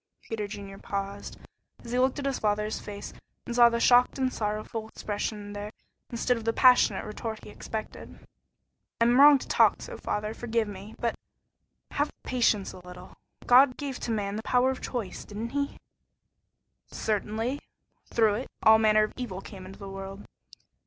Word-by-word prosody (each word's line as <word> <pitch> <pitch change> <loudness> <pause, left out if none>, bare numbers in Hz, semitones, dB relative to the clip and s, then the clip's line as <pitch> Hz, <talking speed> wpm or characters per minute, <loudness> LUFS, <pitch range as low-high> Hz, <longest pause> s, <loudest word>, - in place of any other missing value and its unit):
Peter 215 -2 -4
Junior 195 -1 -8
paused, 200 0 -5 0.5
as 235 - -7
he 250 - +1
looked 260 +2 +2
in 285 - -4
his 275 -2 -1
father's 210 0 0
face 205 -1 -8 0.3
and 235 - -4
saw 240 -1 +8
the 235 0 -1
shocked 245 +2 +5
and 260 -1 0
sorrowful 215 +1 -3
expression 205 -1 -4
there 205 0 -5 0.4
instead 245 +1 0
of 230 - -6
the 230 - +1
passionate 250 +1 +5
retort 220 +1 -6
he - - -10
expected. 220 +1 -7 0.8
"I - - +4
am 240 +2 +4
wrong 290 0 +9
to - - -9
talk - - +4
so, - - -8
father; 210 +1 -3
forgive 230 -1 -1
me; 205 +1 -9
but 235 - -1 0.8
have 290 +1 0
patience 230 -5 +1
a - - -10
little. 180 0 -12 0.3
God 255 +1 +6
gave 275 -3 -4
to - - -5
man 205 -2 -1
the - - -3
power 250 +3 +2
of 260 - -6
choice, 225 -7 -4
didn't 215 +3 -6
he?" 280 +2 -2 1.1
"Certainly. 220 +5 -2 0.5
Through 220 -3 +3
it 250 - -6
all 220 0 +7
manner 215 -1 +5
of 215 - -3
evil 225 -8 -4
came 190 -1 -10
into 195 - -11
the 200 - -9
world." 195 +1 -8
220 Hz, 175 wpm, -28 LUFS, 205-245 Hz, 1.1 s, wrong